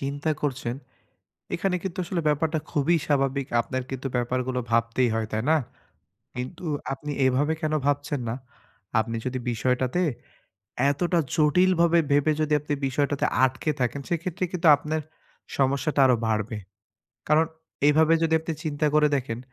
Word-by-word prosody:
চিন্তা 145 +3 -2
করছেন, 130 -4 -2 0.8
এখানে 180 +1 0
কিন্তু 190 -2 -4
আসলে 175 -1 -2
ব্যাপারটা 155 +2 +1
খুবই 160 +4 +2
স্বাভাবিক। 135 -2 +1
আপনার 130 +2 -4
কিন্তু 135 +1 -3
ব্যাপার 125 +1 0
গুলো 125 -1 -1
ভাবতেই 115 +2 +2
হয়, 110 -1 -1
তাই 110 +1 -1
না? 160 - +5 0.8
কিন্তু 130 +9 -6 0.3
আপনি 145 +2 -6 0.2
এভাবে 140 +4 +2
কেনো 155 -1 0
ভাবছেন 145 0 0
না? 115 - -1 0.7
আপনি 115 +1 -3
যদি 130 0 -2
বিষয়টাতে 125 +7 0 0.9
এতটা 170 +4 +1 0.2
জটিল 180 +5 +4
ভাবে 170 0 +5
ভেবে 145 +2 +4
যদি 155 0 +1
আপনি 150 0 -3
বিষয়টাতে 140 +1 0 0.2
আটকে 130 +4 +1
থাকেন, 125 +3 -1
সেক্ষেত্রে 175 +1 -2
কিন্তু 170 -2 +1
আপনার 155 +2 -3 0.6
সমস্যাটা 140 +2 +1
আরো 125 -2 +5
বাড়বে। 110 0 -1 0.7
কারণ, 155 +1 +4 0.4
এভাবে 155 +2 +4
যদি 160 0 +2
আপনি 160 +1 -4
চিন্তা 150 0 0
করে 150 0 +5
দেখেন, 120 -3 -3
145 Hz, 145 wpm, -25 LUFS, 130-160 Hz, 0.9 s, না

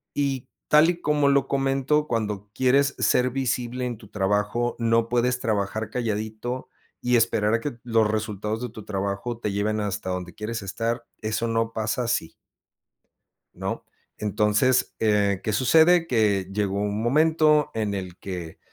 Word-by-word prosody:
Y 135 -3 -1 0.2
tal 150 +2 +6
y 175 0 -8
como 150 -2 +2
lo 140 -1 +3
comento, 135 +2 +1
cuando 105 -4 -2
quieres 135 +3 +3
ser 125 0 +3
visible 125 -1 -2
en 120 -2 -3
tu 105 -1 -15
trabajo, 105 +4 0
no 115 0 +2
puedes 125 +1 +1
trabajar 110 -1 -1
calladito 110 +2 -3 0.3
y 125 0 +2
esperar 110 -2 +2
a - - 0
que 120 -2 -4
los 115 -3 +2
resultados 110 0 -2
de 125 - -3
tu 110 -1 -11
trabajo 100 +4 -3
te 105 -3 -2
lleven 105 +2 0
hasta 100 -1 -3
donde 90 -1 -4
quieres 110 +1 -4
estar, 115 +4 -3 0.2
eso 110 +2 -1
no 115 0 0
pasa 110 +3 -1
así. 115 -8 -1 1.2
¿No? - - -4 0.3
Entonces, 105 +4 +2
eh, 105 -3 +2
¿qué 110 - -1
sucede? 160 - +5
Que 105 - +2
llegó 100 -1 -1
un 105 +1 -1
momento 150 +3 +3
en 105 -2 -1
el 95 -3 -5
que, 90 -4 -7
115 Hz, 155 wpm, -25 LUFS, 105-125 Hz, 1.2 s, tal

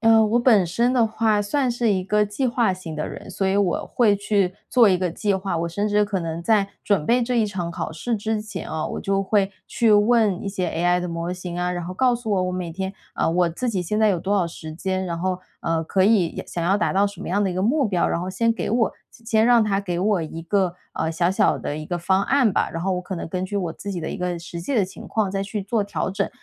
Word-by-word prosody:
嗯， 225 -1 +5
我 240 +1 +3
本 220 -8 +5
身 235 +8 +1
的 235 -3 +3
话 220 -1 +1
算 255 +5 0
是 235 -3 +1
一 185 - 0
个 210 +3 +2
计 205 +6 -3
划 235 -6 +2
型 165 -4 -8
的 150 - -3
人， - - -9
所 195 - -1
以 190 +1 +2
我 195 -4 +1
会 215 -5 +3
去 200 -2 +1 0.2
做 240 -4 +5
一 185 -2 +3
个 185 - 0
计 205 +2 0
划。 190 -2 -2
我 170 +1 -1
甚 205 +5 -1
至 210 0 +3
可 200 -2 -2
能 165 0 -4
在 210 -1 +3 0.2
准 190 -7 +1
备 245 +1 +3
这 245 0 0
一 220 - +3
场 185 -4 -4
考 165 - -4
试 225 +9 -2
之 215 +1 -2
前 215 - -7
啊， 160 -1 -3
我 - - -4
就 195 0 0
会 195 0 +1 0.2
去 225 -2 +3
问 210 -2 +3
一 200 - -3
些 185 -3 -2
AI 175 +2 +1
的 180 - -3
模 170 +1 -3
型 180 -1 -6
啊， 180 0 -1
然 175 -1 -3
后 185 - -6
告 250 +3 +3
诉 225 -3 -4
我 185 -2 +2
我 180 - -1
每 180 -2 -4
天 190 +2 -4 0.2
啊， - - +1
我 175 0 +2
自 240 +9 -2
己 195 -5 -1
现 210 +5 -1
在 215 - +5
有 185 -4 +1
多 200 +4 -1
少 185 - +2
时 160 -2 -7
间， 185 +2 -2
然 170 -1 -3
后， 185 +1 -1 0.2
呃， 165 -1 -1
可 190 +3 +1
以， 200 -3 +4
也 - - -7
想 170 - -3
要 190 +3 +3
达 210 - 0
到 200 +1 +3
什 200 -3 -8
么 - - -6
样 205 +3 +1
的 195 - +1
一 180 - -3
个 185 - -1
目 265 +4 +2
标。 185 -4 +1
然 170 - -1
后 180 - -4
先 230 +5 +1
给 230 - -4
我， 230 -2 +2 0.2
先 230 - -19
先 220 -1 +3
让 240 -2 +6
它 200 -2 +1
给 180 -3 -3
我 200 -1 +2
一 165 +1 -6
个， 185 0 +1 0.2
呃， 160 0 -1
小 170 +2 +1
小 205 +2 +2
的 145 - -4
一 155 0 -6
个 175 - -2
方 190 +3 +1
案 265 -6 +3
吧， - - +1
然 165 - -4
后 190 - 0
我 180 - -2
可 185 +1 -6
能 170 - -5
根 185 +2 -2
据 200 +2 -4
我 175 -4 -2
自 200 +3 -6
己 175 - -4
的 - - -4
一 - - -4
个 180 -1 -2
实 170 0 -7
际 260 +11 -3
的 205 -5 +3
情 190 - -10
况 210 -4 0
再 195 0 -2
去 205 0 -4
做 205 +1 0
调 200 -1 -2
整。 195 - -1
195 Hz, 310 characters per minute, -23 LUFS, 175-215 Hz, 0.2 s, 让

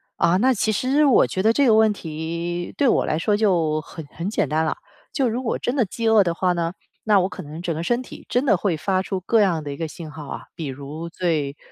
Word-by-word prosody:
啊， 170 +2 +3
那 255 +6 +3
其 215 -1 0
实 265 +8 +2
我 270 - +5
觉 190 - -2
得 220 - +5
这 280 +4 +3
个 230 - +5
问 220 0 +5
题 170 0 -4
对 280 - +3
我 - - +3
来 155 - 0
说 205 +4 +1
就 170 -7 +1
很 160 0 -10
很 170 +6 -5
简 215 - 0
单 155 +1 +1
了， 160 - -1 0.3
就 270 -3 +1
如 240 +3 -3
果 230 - -1
真 245 - -2
的 260 - +3
饥 230 +4 -3
饿 220 -2 +6
的 170 -2 -1
话 180 +1 +1
呢， 170 0 -2 0.3
那 210 -3 +4
我 185 - +1
可 - - -8
能 155 +2 -8
整 170 -2 -2
个 160 - -3
身 240 +7 0
体 255 - -11
真 250 +3 +1
的 230 - +4
会 180 -3 0
发 185 +4 0
出 190 0 -3
各 220 +4 +3
样 170 -6 +1
的 145 - -5
一 140 - -6
个 165 - -3
信 155 0 -9
号 150 -1 -9
啊。 - - -6
比 160 - -5
如 145 +5 -7
最 155 -5 -1
180 Hz, 280 characters per minute, -22 LUFS, 160-220 Hz, 0.3 s, 饿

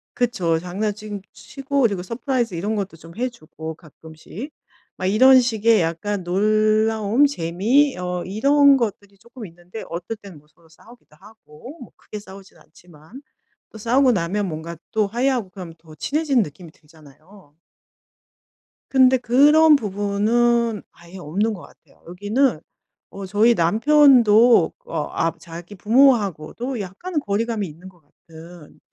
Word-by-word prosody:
그쵸. 185 -10 0
장난징 205 +3 -5
치고 275 0 -4
그리고 200 -6 0
서프라이즈 235 0 -3
이런 205 +6 -3
것도 195 -5 -5
좀 165 +1 -15
해 250 +2 -1
주고 160 -7 -10
가끔씩. 160 - -12 0.5
막 185 - -3
이런 255 +7 +6
식의 225 -3 +2
약간 180 +4 -3
놀라움 215 +5 +2
재미 235 - +1
어 180 -1 -4
이런 280 +8 +4
것들이 205 -4 -5
쪼끔 235 +2 -12
있는데 175 +4 -11
어떨 175 +6 -6
땐 195 -7 -14
뭐 150 - -28
서로 165 +2 -27
싸우기도 225 0 -20
하고 220 - -15
뭐 245 - -12
크게 210 - -10
싸우진 195 -1 -15
않지만. 175 - -17 0.5
또 - - -13
싸우고 250 +4 +2
나면 195 +2 -2
뭔가 165 0 -7
또 215 -2 0
화해하고 240 -1 -1
그러면 180 -3 -10
더 160 -1 -17
친해지는 280 - 0
느낌이 165 +1 -12
들잖아요. 155 +2 -21 1.3
근데 260 -1 +4
그런 295 +6 +5
부분은 220 +1 0
아예 170 +2 -15
없는 190 +7 -2
것 190 - -9
같아요. 140 - -20
여기는 205 - -1 0.5
어 195 0 -8
저희 210 +5 +3
남편도 230 - +4
어 150 - -4
아 165 - -1
자기 170 +4 -11
부모하고도 230 - +1
약간은 210 - -5
거리감이 215 -3 -2
있는 170 +4 -13
것 175 -3 -24
같은 160 +2 -16
205 Hz, 295 characters per minute, -21 LUFS, 170-240 Hz, 1.3 s, 이런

